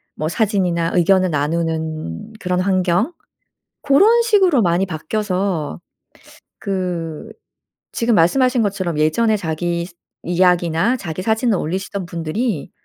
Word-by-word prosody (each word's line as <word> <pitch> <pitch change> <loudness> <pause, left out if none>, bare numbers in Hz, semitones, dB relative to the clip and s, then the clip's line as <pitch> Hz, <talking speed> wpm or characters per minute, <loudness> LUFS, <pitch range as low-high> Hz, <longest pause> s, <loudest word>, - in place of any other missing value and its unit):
뭐 155 - -2
사진이나 180 -4 0
의견을 185 +1 +3
나누는 160 - -3
그런 180 -2 -1
환경 185 - +1 0.7
고런 405 +12 +5
식으로 385 - +3
많이 175 +1 +1
바뀌어서 180 - -2 0.8
그 175 -5 -4 0.6
지금 235 -1 +1
말씀하신 245 +8 +3
것처럼 190 -5 -2
예전에 215 +9 +2
자기 170 0 -2 0.4
이야기나 175 +4 +2
자기 175 -5 -5
사진을 220 0 +1
올리시던 190 +3 -4
분들이 170 - -3
180 Hz, 265 characters per minute, -19 LUFS, 165-215 Hz, 0.8 s, 고런